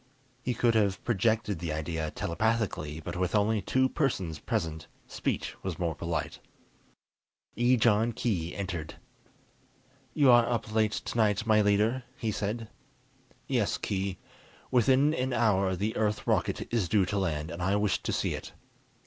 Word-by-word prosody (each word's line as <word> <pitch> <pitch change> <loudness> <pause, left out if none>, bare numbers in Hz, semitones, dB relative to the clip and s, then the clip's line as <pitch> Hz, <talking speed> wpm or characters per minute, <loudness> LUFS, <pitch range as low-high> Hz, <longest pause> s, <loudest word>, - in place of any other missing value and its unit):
He 125 - -2
could 120 0 +3
have 100 -4 +1
projected 110 -3 +1
the 85 -1 -3
idea 80 0 -2
telepathically; 90 -5 -1
but - - -6
with 90 +2 -1
only 105 +1 +2
two 130 +7 +2
persons 95 - -1
present, 80 -8 -3 0.2
speech - - -3
was 95 -4 -4
more 85 -2 -1
polite. 85 +1 -3 1.2
Ejon 120 -1 +3
Khee 90 -8 -2
entered. 90 -6 -4 1.2
"You 140 -4 +6
are 120 -1 +5
up 115 -3 -2
late 110 -1 +2
tonight, 110 -2 0
my 110 -1 +4
leader," 105 +5 +2 0.2
he 115 -5 -1
said. 110 +3 -3 0.8
"Yes, 120 -7 +1
Khee. 95 -2 -2 0.5
Within 130 +4 +4
an 130 -3 -1
hour 95 -5 +2
the 105 +4 -2
Earth 105 -1 0
rocket - - -1
is 105 -8 +1
due 100 -3 +3
to 100 +2 -1
land, 80 -4 -2
and 85 +1 -6
I 95 +3 +2
wish 105 -1 +1
to - - -2
see - - 0
it. - - -7
105 Hz, 150 wpm, -29 LUFS, 90-115 Hz, 1.2 s, You